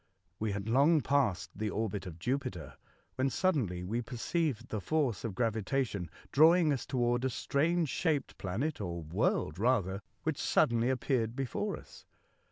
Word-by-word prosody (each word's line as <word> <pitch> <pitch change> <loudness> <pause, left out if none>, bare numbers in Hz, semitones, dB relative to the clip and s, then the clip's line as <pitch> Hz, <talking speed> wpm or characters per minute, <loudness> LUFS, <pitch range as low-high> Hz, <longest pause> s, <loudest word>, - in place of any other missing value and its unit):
We 110 -2 -1
had 100 +1 -4
long 145 +7 +4
passed 135 -10 +1
the 105 +1 -2
orbit 105 -2 -2
of 85 -3 -8
Jupiter, 95 - -3 0.4
when 130 +1 +2
suddenly 125 - 0
we 115 +6 -1
perceived 130 +3 -2
the 110 - -3
force 135 -6 0
of 110 -5 -4
gravi 115 -1 0
tation 100 - -1 0.2
drawing 160 +1 +6
us 135 - -4
toward 120 -1 +1
a 130 - +2
strange 160 +6 +1
shaped 155 -3 0
planet,, 115 +10 -2
or 85 -3 -4
world 80 0 0
rather, 105 -5 +1 0.2
which 155 -3 -1
suddenly 120 +1 +3
ap 130 -2 0
peared 120 -4 0
near 135 -5 -2
us. - - -15
120 Hz, 160 wpm, -32 LUFS, 100-140 Hz, 0.4 s, drawing